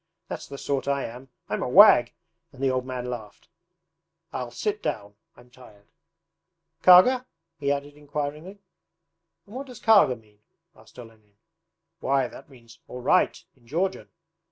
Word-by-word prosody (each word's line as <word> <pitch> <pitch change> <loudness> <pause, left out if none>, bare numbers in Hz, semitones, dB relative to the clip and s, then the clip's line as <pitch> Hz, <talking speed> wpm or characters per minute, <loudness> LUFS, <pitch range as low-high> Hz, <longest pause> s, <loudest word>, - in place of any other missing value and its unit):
That's - - -6
the 140 - -9
sort 140 0 -3
I 140 -1 0
am! 125 +3 -10 0.2
I'm - - -3
a - - -2
wag!' - - +7 0.4
and 130 - -17
the 135 - +2
old 130 0 -2
man 125 -1 -5
laughed. 110 -5 -8 0.8
'I'll 125 -1 -4
sit 210 - -3
down. 100 -1 -4 0.2
I'm 120 0 -19
tired. 110 -5 -18 1.0
Karga?' 250 +8 +6 0.3
he 140 -1 0
added 145 +1 -3
inquiringly. 150 +5 -6 0.9
'And 210 +3 -14
what 275 +2 -6
does 250 -3 -11
"Karga" 210 - +5
mean?' 105 -2 -27 0.3
asked - - -20
Olenin. 110 -4 -15 0.6
'Why, 135 -1 +1
that - - -14
means 115 -4 -18
"All 125 - -8
right" - - +2
in 120 - -27
Georgian. 180 +8 -2
135 Hz, 150 wpm, -25 LUFS, 120-150 Hz, 1.0 s, wag